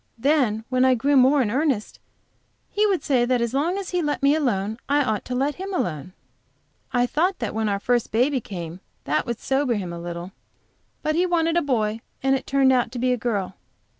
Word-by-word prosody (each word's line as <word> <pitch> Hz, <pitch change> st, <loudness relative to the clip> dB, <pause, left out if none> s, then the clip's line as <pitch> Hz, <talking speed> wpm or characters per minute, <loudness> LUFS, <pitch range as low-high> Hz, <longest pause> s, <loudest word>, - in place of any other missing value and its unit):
Then 250 Hz, -4 st, +1 dB
when 255 Hz, 0 st, +2 dB
I 260 Hz, -1 st, +5 dB
grew 280 Hz, +5 st, +1 dB
more 265 Hz, +1 st, +5 dB
in 210 Hz, -, -2 dB
earnest 270 Hz, -4 st, -1 dB, 0.7 s
he 420 Hz, +1 st, +2 dB
would 385 Hz, -4 st, 0 dB
say, 255 Hz, -4 st, +2 dB
that 250 Hz, 0 st, +1 dB
as 235 Hz, 0 st, -1 dB
long 325 Hz, +8 st, 0 dB
as 395 Hz, -2 st, -5 dB
he 360 Hz, -1 st, 0 dB
let 295 Hz, -3 st, -2 dB
me 280 Hz, +1 st, +5 dB
alone 225 Hz, -7 st, -1 dB
I 290 Hz, +1 st, +3 dB
ought 215 Hz, -5 st, -1 dB
to 250 Hz, -, -4 dB
let 275 Hz, +3 st, 0 dB
him 390 Hz, +1 st, -4 dB
alone. 170 Hz, -, -3 dB, 0.8 s
I 245 Hz, -1 st, +2 dB
thought 345 Hz, +9 st, 0 dB
that 230 Hz, -, -3 dB
when 220 Hz, -1 st, 0 dB
our 200 Hz, -1 st, 0 dB
first 240 Hz, +2 st, 0 dB
baby 255 Hz, +4 st, +2 dB
came 175 Hz, -4 st, -7 dB, 0.2 s
that -, -, -1 dB
would 235 Hz, -1 st, -3 dB
sober 270 Hz, -2 st, 0 dB
him 185 Hz, -4 st, -4 dB
a 170 Hz, -, -6 dB
little, 170 Hz, +1 st, -6 dB, 0.7 s
but 310 Hz, -, +1 dB
he 355 Hz, +3 st, +2 dB
wanted 330 Hz, -1 st, +1 dB
a 345 Hz, -, +3 dB
boy 225 Hz, -6 st, -1 dB, 0.2 s
and 270 Hz, 0 st, +3 dB
it 265 Hz, -, -5 dB
turned 270 Hz, -1 st, +4 dB
out 245 Hz, -3 st, +1 dB
to -, -, -5 dB
be 250 Hz, +1 st, +1 dB
a -, -, +2 dB
girl. 205 Hz, -6 st, -2 dB
255 Hz, 220 wpm, -23 LUFS, 220-290 Hz, 0.8 s, I